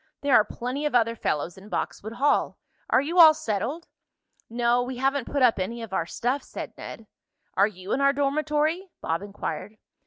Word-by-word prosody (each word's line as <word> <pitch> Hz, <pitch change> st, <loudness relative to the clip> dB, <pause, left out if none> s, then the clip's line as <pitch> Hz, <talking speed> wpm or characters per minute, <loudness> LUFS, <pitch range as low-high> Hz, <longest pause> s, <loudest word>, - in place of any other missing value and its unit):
There 285 Hz, -1 st, +1 dB
are 215 Hz, -, +7 dB
plenty 250 Hz, +7 st, -3 dB
of 290 Hz, -, -3 dB
other 230 Hz, -1 st, +3 dB
fellows 170 Hz, -2 st, -2 dB
in 200 Hz, +2 st, -14 dB
Boxwood 220 Hz, +1 st, -4 dB
Hall. 275 Hz, +5 st, +1 dB, 0.3 s
Are -, -, +4 dB
you 335 Hz, +6 st, 0 dB
all 315 Hz, -2 st, +10 dB
settled?" 275 Hz, -, -3 dB, 0.6 s
"No, 240 Hz, +1 st, +2 dB
we 250 Hz, 0 st, -4 dB
haven't 270 Hz, 0 st, 0 dB
put 280 Hz, -2 st, +1 dB
up 235 Hz, -5 st, +4 dB
any 230 Hz, +5 st, -3 dB
of 220 Hz, -, -9 dB
our 165 Hz, -3 st, 0 dB
stuff," 255 Hz, +9 st, -1 dB
said -, -, -8 dB
Ned. 225 Hz, -, -9 dB, 0.5 s
"Are 200 Hz, +2 st, +4 dB
you 190 Hz, -2 st, -9 dB
in 275 Hz, -, 0 dB
our 275 Hz, 0 st, +5 dB
dormitory?" 305 Hz, +5 st, 0 dB
Bob 165 Hz, +2 st, -2 dB
inquired. 205 Hz, 0 st, -6 dB
245 Hz, 185 wpm, -26 LUFS, 215-285 Hz, 0.6 s, all